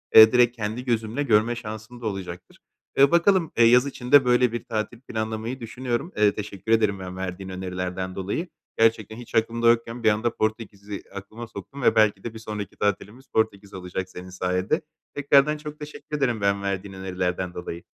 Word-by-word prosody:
eee, 110 0 +11
direkt 125 -1 +4
kendi 110 +3 -4
gözümle 115 +3 -1
görme 115 -1 +3
şansım 110 +1 -8
da - - -7
olacaktır. 90 -3 -7 0.4
Eee, 140 0 +6
bakalım, 170 -1 +3
eee, 115 - +7
yaz 125 +3 +6
içinde 135 0 +3
böyle 125 -1 +4
bir 120 - -4
tatil 110 +1 -4
planlamayı 110 +1 -4
düşünüyorum. 120 - -3
Eee, 105 -1 +5
teşekkür 105 +1 -5
ederim 105 -3 +3
ben 90 -1 -7
verdiğin 95 0 -5
önerilerden 90 0 -4
dolayı. 100 - -3 0.3
Gerçekten 110 -1 +2
hiç 120 -1 -10
aklımda 115 +1 +3
yokken 115 0 0
bir 110 - +6
anda 110 +2 0
Portekiz’i 105 -2 -3
aklıma 110 +4 -8
soktun 125 +9 -9
ve 115 -2 +4
belki 105 -3 +3
de 115 - -5
bir 110 - -9
sonraki 105 -2 -6
tatilimiz 105 +5 -2
Portekiz 105 -3 -1
olacak 95 0 -5
senin 90 0 -9
sayende. 90 - -1 0.3
Tekrardan 145 +1 +4
çok 150 0 -9
teşekkür 150 0 -6
ederim 120 -6 0
ben, 100 0 +1
verdiğin 100 0 -3
önerilerden 90 -1 -3
dolayı. 85 -1 -6
110 Hz, 175 wpm, -25 LUFS, 100-120 Hz, 0.4 s, eee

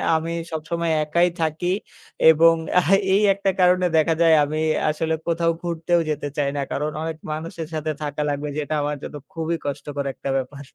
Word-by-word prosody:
আমি 165 +1 -2 0.2
সবসময় 165 +1 -2
একাই 170 +4 +2
থাকি 160 +2 -1 0.6
এবং 165 +1 +6 0.2
এহ, 180 -2 +3 0.2
এই 200 - +4
একটা 195 0 -1
কারণে 180 0 +4
দেখা 160 +1 +3
যায় 165 -1 +6
আমি 155 +2 -2 0.3
আসলে 160 +1 -1
কোথাও 165 0 +2
ঘুরতেও 170 0 0
যেতে 150 -1 -2
চাই 140 -1 +1
না। 140 - -1
কারণ 150 +2 -1
অনেক 160 -1 -4
মানুষের 160 +1 -5
সাথে 155 0 -2
থাকা 145 0 -3
লাগবে 145 +1 -2
যেটা 150 +1 -2
আমার 145 0 -1
জন্য - - -7 0.2
খুবই 165 -1 -2
কষ্টকর 145 0 -4
একটা 135 - -6
ব্যাপার। 140 +2 -5
160 Hz, 175 wpm, -23 LUFS, 150-170 Hz, 0.6 s, এবং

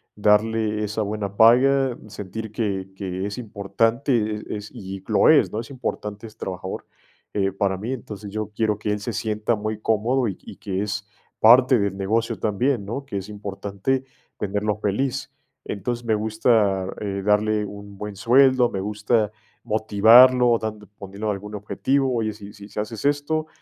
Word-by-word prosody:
darle 105 +1 +2
esa 105 +1 -2
buena 100 -1 -3
paga, 130 +3 +5
sentir 105 +1 -7
que 100 -4 -2
que 95 -1 -4
es 100 +4 -5
importante, 115 +4 -1
e 105 -1 -2
es 105 0 -8
y 95 0 -8
lo - - +4
es, - - +5
¿no? 110 - -3
Es 115 - -7
importante, 105 -4 -5
ese 110 0 -16
trabajador, 95 0 -5 0.5
eh, 100 -1 +1
para 95 0 0
mí. 110 +6 -4
Entonces, 105 -5 -7
yo 110 0 -4
quiero 110 -2 +1
que 105 0 -2
él 105 - -1
se 115 +3 -4
sienta 110 +1 -1
muy 110 0 -4
cómodo 115 +4 +1
y 100 - -4
y - - -11
que 95 -1 -3
es 100 -1 -4 0.3
parte 125 +2 +7
del 100 -1 -1
negocio 110 +4 0
también, 110 +1 0
¿no? 135 +7 -5
Que 100 - -5
es 100 +1 -6
importante 100 +5 -3 0.3
tenerlo 105 +1 -1
feliz. 105 +6 -2 0.3
Entonces, 120 +4 -4
me 110 -1 +2
gusta, 105 -3 +2
eh, 100 -1 -3
darle, 105 0 +2
un 100 0 -10
buen 105 0 -6
sueldo, 125 +3 +4
me 95 - -4
gusta 105 +2 0 0.3
motivarlo, 115 +3 +6
dando 105 -1 -5
poniendo 100 +2 -5
algún 105 +1 -4
objetivo, 130 +6 0
oye, 110 -2 0
si 100 -1 -11
si 105 0 -8
haces 110 +1 -4
esto, 145 +2 0
105 Hz, 165 wpm, -23 LUFS, 100-115 Hz, 0.5 s, parte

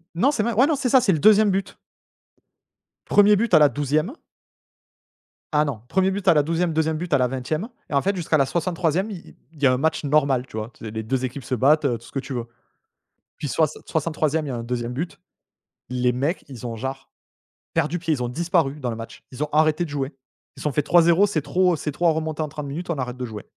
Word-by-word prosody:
Non 260 - +3
c'est 220 -7 0
mais 235 - 0
ouais 255 +6 +4
non 315 - +2
c'est 270 -2 -1
ça 260 +1 +6
c'est 200 -5 +2
le 160 - 0
2e 215 +4 +6
but. 195 +1 -3 1.3
1er 205 0 +5
but 230 +3 -1
à - - +8
la 150 -1 +6
12e. 145 - -1 1.4
Ah 150 0 +3
non, 130 -7 -4
1er 190 0 +2
but 200 0 -4
à - - +7
la 150 -2 +3
12e, 165 +2 0
2e 160 0 0
but 170 -1 -4
à 140 - +6
la 125 - +2
20e 135 - -3 0.2
et - - -7
en 140 - +3
fait, 200 +5 0
jusqu'à 165 -3 +1
la 135 - +3
63e 170 +5 -1
il 190 - -5
il - - -16 0.2
il 150 - -17
y 135 - +7
a 130 - +4
un - - +1
match 155 +2 0
normal 140 -3 +2
tu - - -13
vois? 110 +2 -4
Tu - - -12
sais 105 - -5
les 110 0 -4
2 130 +3 -1
équipes 130 +1 -6
se 130 - -2
battent, 150 +6 +4
heu, 125 -5 +1
tout 115 - -17
ce 115 - -14
que 135 - -1
tu 135 - -6
veux. 120 -2 -3 0.9
Puis 145 - -4
soixan 155 +2 0
soixante-troisième 155 -1 -1
il - - -4
y - - -3
a 125 - -3
un 115 - -4
2e 120 0 -3
but. 165 +7 -5 0.7
Les 125 0 +1
mecs 140 +9 -2
ils 125 -3 -9
ont, 115 -1 -4
genre, 135 +3 -6 0.6
perdu 165 +2 0
pied. 165 -2 0
Ils 125 -4 -2
ont 120 - -2
disparu 160 -1 0
dans 125 - -3
le 115 - -3
match. 115 0 -9
Ils 135 +4 -3
ont - - -4
arrêté 155 +2 +3
de 170 - -5
jouer. 140 0 -3 0.4
Ils - - -10
ont - - 0
fait: 150 - +1
«3-0 170 +5 +4
c'est 165 -7 -1
trop 180 +3 +2
c'est 150 0 -4
trop 170 +4 0
à 165 - +5
remonter 155 0 -2
en 155 - -1
30 150 0 -7
minutes, 165 +6 -6
on 170 - 0
arrête 125 -1 -4
de 125 - -4
jouer». 110 -3 -8
150 Hz, 255 wpm, -23 LUFS, 130-170 Hz, 1.4 s, à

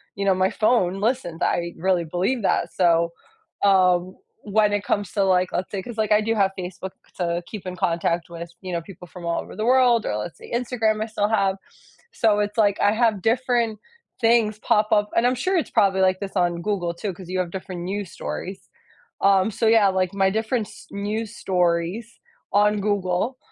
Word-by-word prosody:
you 200 - -3
know, 195 - +4
my 185 0 +2
phone 195 -4 +1
listens. 205 -7 -1
I 170 0 -1
really 180 -1 +1
believe 190 +10 -1
that, 195 - 0
so, 170 -2 +3 0.5
um, 185 -2 +3 0.3
when 210 0 +2
it 205 0 0
comes 200 -3 -1
to, 200 - +2
like, 185 -1 +2
let's 185 - -2
say 195 - -3
'cause, 230 +3 -9
like, 215 -1 0
I 210 - +6
do 225 +1 0
have 195 -2 +2
Facebook 185 +1 -6 0.3
to 175 -1 -1
keep 205 -4 -8
in 180 - -5
contact 170 0 0
with, 170 0 -8
you 185 -1 -6
know, 170 - -1
people 180 0 -12
from 175 +1 -10
all 170 0 0
over - - -11
the 215 - -3
world, 245 -3 +4
or 105 - -1
let's 105 +10 -6
say, - - -13
Instagram, 225 -3 0
I - - 0
still 215 -2 -1
have. 195 -3 +2 0.6
So, 215 -2 +2
it's 210 +1 -2
like, 205 -3 +3
I 205 - +4
have 220 -3 +1
different 230 -1 +1 0.4
things 225 -2 +3
pop 215 -2 +1
up, 210 0 +3
and 230 - +3
I'm 250 - +3
sure 365 +10 -1
it's 330 - -2
probably 190 -1 +3
like 185 0 +3
this 200 -1 -6
on 175 -2 +1
Google 175 -4 -1
too 195 +3 -4
'cause 180 0 -12
you 185 - -2
have 180 -2 -2
different 185 -1 -6
news 195 0 -4
stories. 190 +1 -6 0.5
Um, 195 +1 +4
so, 225 - -2
yeah, 220 -2 +5
like, 185 -1 0
my 195 -1 +2
different 220 +1 -1
s - - -14
news 210 +2 -3
stories 180 +5 -1 0.3
on 210 0 +3
Google, 200 +4 -1
200 Hz, 205 wpm, -23 LUFS, 180-220 Hz, 0.6 s, I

